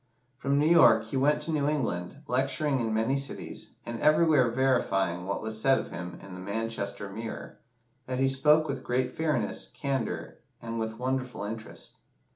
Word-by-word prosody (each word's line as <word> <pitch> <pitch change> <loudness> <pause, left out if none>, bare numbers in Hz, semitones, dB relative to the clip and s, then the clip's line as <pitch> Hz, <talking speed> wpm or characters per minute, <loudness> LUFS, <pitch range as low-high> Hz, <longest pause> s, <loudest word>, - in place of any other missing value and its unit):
From 140 +2 0
New 145 - +3
York 170 +2 +6
he - - -6
went 145 +3 +3
to 165 - -1
New 145 -2 +1
England, 130 - -2
lecturing 135 +2 0
in 115 -2 -1
many 110 +5 +1
cities, 140 0 -5
and 115 -1 -5
everywhere 155 -4 +5
verifying 95 -9 +1
what 100 - -2
was 110 0 -3
said 135 +1 +4
of - - -5
him 90 +1 -6
in 95 -1 -10
the 90 - -8
"Manchester 100 0 -3
Mirror," 110 +3 -7 0.5
that 130 0 -2
he 135 +1 +3
spoke 150 +4 +4
with 140 -2 -4
great 125 +1 0
fairness, 160 -1 -1
candour, 135 -5 -3 0.2
and 115 0 -5
with 110 0 -3
wonderful 130 -3 -2
interest. 110 +1 -7
130 Hz, 170 wpm, -28 LUFS, 110-140 Hz, 0.5 s, York